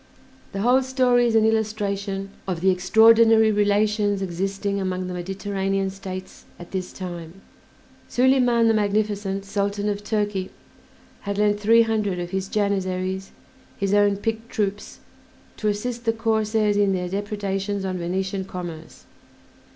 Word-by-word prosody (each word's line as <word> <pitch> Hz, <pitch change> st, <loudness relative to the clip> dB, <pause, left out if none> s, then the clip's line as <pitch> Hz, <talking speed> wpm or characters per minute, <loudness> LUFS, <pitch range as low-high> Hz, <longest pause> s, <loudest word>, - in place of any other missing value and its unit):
The 195 Hz, -, -4 dB
whole 250 Hz, +4 st, +4 dB
story 255 Hz, -2 st, +2 dB
is 225 Hz, -, 0 dB
an 220 Hz, -1 st, +5 dB
illustration 200 Hz, -3 st, -1 dB, 0.2 s
of 180 Hz, -3 st, -3 dB
the 190 Hz, +1 st, +4 dB
extraordinary 220 Hz, +4 st, +5 dB
relations 205 Hz, -1 st, +1 dB
existing 195 Hz, +2 st, -2 dB
among 185 Hz, -1 st, -2 dB
the 180 Hz, -, -5 dB
Mediterranean 195 Hz, +1 st, -2 dB
States 190 Hz, -1 st, -8 dB
at 175 Hz, -, -12 dB
this 185 Hz, -1 st, -4 dB
time. 175 Hz, -1 st, -8 dB, 0.7 s
Soliman 245 Hz, -2 st, +3 dB
the 225 Hz, -, +4 dB
Magnificent, 205 Hz, -2 st, -1 dB
Sultan 200 Hz, +1 st, -1 dB
of 205 Hz, 0 st, -2 dB
Turkey, 205 Hz, -3 st, -1 dB, 0.7 s
had 200 Hz, -1 st, -4 dB
lent 205 Hz, 0 st, +2 dB
three 230 Hz, +2 st, +5 dB
hundred 215 Hz, -4 st, -1 dB
of 175 Hz, 0 st, -5 dB
his 190 Hz, 0 st, -2 dB
Janissaries, 190 Hz, -2 st, -1 dB, 0.5 s
his 200 Hz, 0 st, -1 dB
own 205 Hz, -1 st, +4 dB
picked 225 Hz, +2 st, -3 dB
troops, 205 Hz, -1 st, -3 dB, 0.6 s
to 215 Hz, -, -2 dB
assist 235 Hz, +3 st, -2 dB
the 225 Hz, -, +2 dB
corsairs 220 Hz, -2 st, +1 dB
in 200 Hz, -1 st, +3 dB
their 180 Hz, -1 st, -2 dB
depredations 200 Hz, 0 st, -3 dB
on 185 Hz, -1 st, -3 dB
Venetian 190 Hz, +2 st, -2 dB
commerce. 170 Hz, -4 st, -8 dB
200 Hz, 135 wpm, -23 LUFS, 190-215 Hz, 0.7 s, an